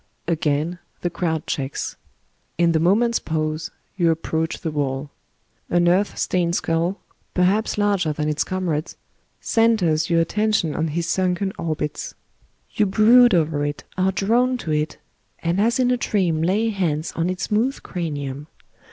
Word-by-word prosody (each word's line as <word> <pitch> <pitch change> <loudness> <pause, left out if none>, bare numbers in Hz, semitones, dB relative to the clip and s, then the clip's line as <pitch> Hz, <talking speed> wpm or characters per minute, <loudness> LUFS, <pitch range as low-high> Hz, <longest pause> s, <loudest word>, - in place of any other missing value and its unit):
Again 160 +1 0 0.2
the 175 - -1
crowd 160 -3 -2
checks. 135 0 -3 0.6
In 170 0 +3
the 160 - +2
moment's 225 +8 +3
pause 155 0 -2 0.3
you 170 -3 +3
approach 160 0 -1
the 160 - -2
wall. 140 -1 -2 0.6
An 175 0 +3
earth 190 +4 +2
stained 175 -2 0
skull, 170 +4 0 0.4
perhaps 190 +5 +2
laxger 200 -6 +1
than 150 0 -2
its 150 -1 0
comrades, 175 -4 -3 0.4
centres 185 -9 +2
your 170 -1 +3
attention 210 -1 +1
on 160 - 0
his 165 +2 -2
sunken 185 +2 0
orbits. 155 -2 -3 0.6
You 210 - +2
brood 230 +3 +6
over 155 -3 +1
it, 145 0 -3
are 185 +1 +2
drawn 240 +7 +2
to 160 - -2
it, 150 +1 -1 0.5
and 170 +4 +1
as 230 +3 +2
in 250 -1 +3
a 250 - +2
dream 180 -9 0
lay 200 +7 +2
hands 170 -7 -1
on 165 +2 0
its 185 -1 -3
smooth 235 +6 0
cranium. 145 -5 -4
170 Hz, 150 wpm, -22 LUFS, 155-200 Hz, 0.6 s, brood